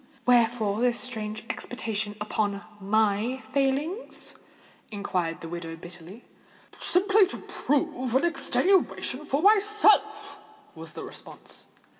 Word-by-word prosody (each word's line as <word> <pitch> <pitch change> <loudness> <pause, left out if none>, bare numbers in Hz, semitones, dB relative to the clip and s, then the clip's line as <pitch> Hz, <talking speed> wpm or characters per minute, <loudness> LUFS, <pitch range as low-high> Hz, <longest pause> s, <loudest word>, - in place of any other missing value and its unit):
"Wherefore 230 -3 +3
this 245 -1 +2
strange 215 -3 -4
expatiation 220 -5 -3
upon 205 -1 -1 0.2
my 215 +4 +1 0.2
failings?" 285 - -1 0.6
inquired 185 -6 -2
the 165 - -6
widow 165 -1 -6
bitterly. 175 +6 -11 0.6
"Simply 395 +2 +4
to - - -5
prove 260 -3 -1
an 270 - +4
extenuation 340 -4 +1
for 285 +3 0
myself," 425 0 +3 0.3
was - - -10
the - - -7
response. - - -9
245 Hz, 105 wpm, -27 LUFS, 205-335 Hz, 0.6 s, Simply